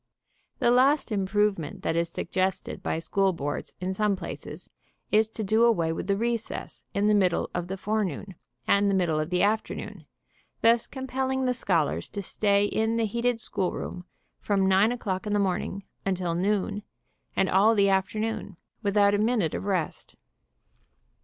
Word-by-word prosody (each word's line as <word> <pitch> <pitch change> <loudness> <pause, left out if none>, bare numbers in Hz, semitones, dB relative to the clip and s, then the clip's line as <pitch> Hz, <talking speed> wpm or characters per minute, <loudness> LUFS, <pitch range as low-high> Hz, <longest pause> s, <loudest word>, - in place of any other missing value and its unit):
The 240 - +3
last 265 +2 +3
"improvement" 195 -4 0
that - - 0
is 170 0 +1
suggested 185 +2 -2
by - - -1
school 195 +3 +1
boards 145 -3 -4
in 185 +1 -2
some 210 +1 +1
places 190 - -8 0.4
is 215 +1 +4
to 220 0 -5
do 220 +3 +3
away 170 -9 +3
with 165 - -5
the 200 -1 +1
recess 230 0 -3
in 200 +1 +2
the 210 - +4
middle 185 -4 +2
of 175 0 -3
the 190 +1 -4
fore 215 +3 0
noon 190 +2 -5 0.3
and 200 0 +4
the 195 - +2
middle 170 -5 +1
of 155 +1 -2
the 180 +1 +1
afternoon, 215 +2 -2 0.6
thus 230 0 +4
compel 265 0 -3
ling 265 0 0
the 250 - +2
scholars 165 - 0
to 200 - -5
stay 200 +1 +2
in 220 +2 0
the 230 - +2
heated 235 +2 0
schoolroom 180 -3 -3 0.3
from 195 -2 +1
9 195 +4 +4
o'clock 205 -5 -3
in 210 - -1
the - - +3
morning 195 0 -1 0.2
until 185 -3 -1
noon, 200 +3 0 0.5
and 195 - +2
all 205 +5 +4
the 200 -1 +4
afternoon, 205 +1 -1 0.2
without 200 0 +3
a 205 - +2
minute 215 -7 +1
of - - -4
rest. 185 -6 -2
200 Hz, 170 wpm, -27 LUFS, 185-220 Hz, 0.6 s, is